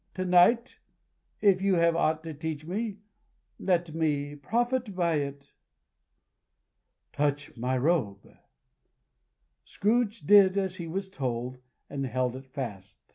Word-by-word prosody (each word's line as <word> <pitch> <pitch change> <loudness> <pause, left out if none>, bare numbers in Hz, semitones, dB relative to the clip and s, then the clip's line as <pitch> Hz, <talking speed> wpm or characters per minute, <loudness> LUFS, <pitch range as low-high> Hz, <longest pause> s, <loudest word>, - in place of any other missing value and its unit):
To 185 -1 -2
night, 205 +8 +4 0.6
if 195 -3 +4
you 195 -1 +3
have 170 -1 +3
aught 160 -1 +1
to 165 -1 -6
teach 155 0 -5
me, 205 +4 -3 0.6
let 175 -4 0
me 145 -3 -1
profit 235 - -1
by 170 -3 +1
it." 140 -1 -5 1.6
"Touch 145 0 -1
my 125 +2 -1
robe!" 125 - 0 1.4
Scrooge 230 +1 0
did 200 -2 +6
as 190 -2 -1
he 170 - -6
was 190 +4 -3
told, 125 -5 -3 0.3
and 140 -2 -3
held 125 -1 -1
it 130 0 -10
fast. 115 -8 -7
160 Hz, 125 wpm, -28 LUFS, 140-190 Hz, 1.6 s, did